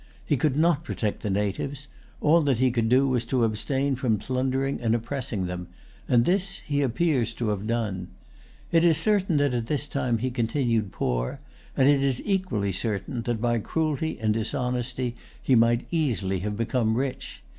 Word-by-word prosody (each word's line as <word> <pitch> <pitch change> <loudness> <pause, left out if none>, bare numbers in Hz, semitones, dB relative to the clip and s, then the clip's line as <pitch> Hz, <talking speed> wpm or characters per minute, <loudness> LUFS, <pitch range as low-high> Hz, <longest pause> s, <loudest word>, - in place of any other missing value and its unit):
He 150 - +2
could 135 +1 +1
not 165 -1 +3
protect 110 -10 -3
the 105 - -2
natives: 105 +9 -2 0.3
all 165 +3 +5
that 140 -5 +2
he 130 +1 +3
could 115 -2 0
do 130 +3 +4
was 125 -3 +1
to 125 0 +1
abstain 130 +5 0
from 120 -4 +1
plundering 130 +5 -1
and 115 -1 +2
oppressing 120 -4 -3
them; 90 -1 -5 0.4
and 120 -1 +4
this 195 +1 +1
he 145 -1 0
appears 130 -3 +1
to 115 -3 -1
have 105 0 -2
done. 105 -6 -2 0.6
It 165 0 +4
is 165 -3 +5
certain 190 -2 +2
that 145 -2 +2
at 120 -2 -2
this 145 +1 -1
time 130 -5 0
he 130 +3 -2
continued 115 -3 0
poor; - - -2 0.4
and 130 - +5
it 140 -1 +4
is 135 -3 +1
equally 185 - 0
certain, 110 +5 -2
that 120 -1 -2
by 120 0 +1
cruelty 160 +5 -1
and 110 -1 +1
dishonesty 125 +2 -2 0.2
he 135 - +1
might 115 0 +4
easily 115 - 0
have 105 +2 -3
become 115 -1 +1
rich. 135 0 -4
125 Hz, 175 wpm, -26 LUFS, 110-140 Hz, 0.6 s, all